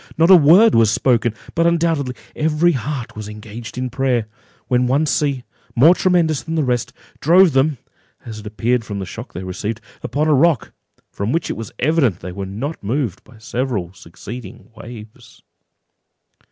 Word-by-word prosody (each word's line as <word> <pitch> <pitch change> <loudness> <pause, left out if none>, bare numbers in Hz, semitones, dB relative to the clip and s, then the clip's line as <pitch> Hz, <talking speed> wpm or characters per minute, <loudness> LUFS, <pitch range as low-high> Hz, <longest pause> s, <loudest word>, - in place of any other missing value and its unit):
Not 165 +3 +5
a - - +11
word 180 +8 +6
was 115 -2 +5
spoken; 120 -1 +1 0.2
but 165 0 +2
undoubtedly 165 -6 0 0.2
every 155 +3 +2
heart 135 -2 -4
was 105 -1 -7
engaged 105 +3 -9
in 125 -1 -3
prayer, 130 -4 0 0.4
when 125 -1 +2
one 140 +5 +2
sea, 140 -2 0 0.3
more 150 +9 +7
tremendous 175 -5 +1
than 165 0 -5
the 155 - +1
rest, 125 -3 -1 0.3
drove 175 +1 +5
them 135 +2 +2 0.5
(as 110 -2 -7
it 105 - -9
appeared 115 +3 0
from 105 -3 -6
the 95 - -4
shock 90 - -9
they 90 - -6
received) 105 +4 -4 0.2
upon 150 +2 -1
a 155 - +4
rock, 145 -2 +2 0.4
from 100 +3 -3
which 165 - -1
it - - -4
was 115 -2 -7
evident 135 - +1
they 90 - -6
were 95 +1 -6
not 120 +11 -5
moved 115 -2 -2
by 120 - -18
several 110 -5 -3
succeeding 100 +6 -10
waves. 110 -1 -12
125 Hz, 170 wpm, -19 LUFS, 110-155 Hz, 0.5 s, a